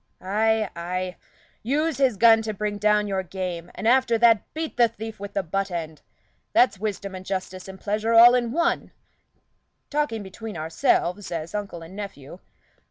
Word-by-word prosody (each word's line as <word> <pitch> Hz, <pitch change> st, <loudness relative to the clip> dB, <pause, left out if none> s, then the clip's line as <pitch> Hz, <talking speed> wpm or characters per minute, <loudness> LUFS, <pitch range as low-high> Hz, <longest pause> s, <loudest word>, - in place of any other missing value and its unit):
"Ay, 215 Hz, +3 st, +1 dB
ay, 180 Hz, +1 st, -3 dB, 0.5 s
use 290 Hz, +4 st, 0 dB
his 260 Hz, -6 st, +2 dB
gun 225 Hz, +1 st, +6 dB
to 215 Hz, -1 st, -4 dB
bring 205 Hz, 0 st, -3 dB
down 210 Hz, 0 st, +3 dB
your 195 Hz, -1 st, -1 dB
game, 180 Hz, -2 st, -5 dB
and 220 Hz, -, -3 dB
after 245 Hz, -1 st, +4 dB
that, 230 Hz, -2 st, +4 dB
beat 320 Hz, 0 st, -4 dB
the 240 Hz, -1 st, +5 dB
thief 220 Hz, -1 st, -8 dB
with 200 Hz, 0 st, -7 dB
the 195 Hz, -, 0 dB
butt 195 Hz, +3 st, -2 dB
end. 160 Hz, -3 st, -5 dB, 0.5 s
That's 235 Hz, -6 st, +4 dB
wisdom 200 Hz, -2 st, -4 dB
and 185 Hz, 0 st, -7 dB
justice 185 Hz, -1 st, -5 dB
and 190 Hz, 0 st, -10 dB
pleasure 215 Hz, +2 st, -1 dB
all 235 Hz, +2 st, +9 dB
in 240 Hz, -2 st, +1 dB
one 340 Hz, +5 st, 0 dB, 1.0 s
talking 290 Hz, -8 st, -1 dB
between 205 Hz, +1 st, -8 dB
ourselves 170 Hz, +4 st, 0 dB
as 165 Hz, -1 st, -4 dB
uncle 200 Hz, -5 st, -5 dB
and 170 Hz, +4 st, -12 dB
nephew. 185 Hz, -6 st, -8 dB
205 Hz, 165 wpm, -24 LUFS, 185-230 Hz, 1.0 s, all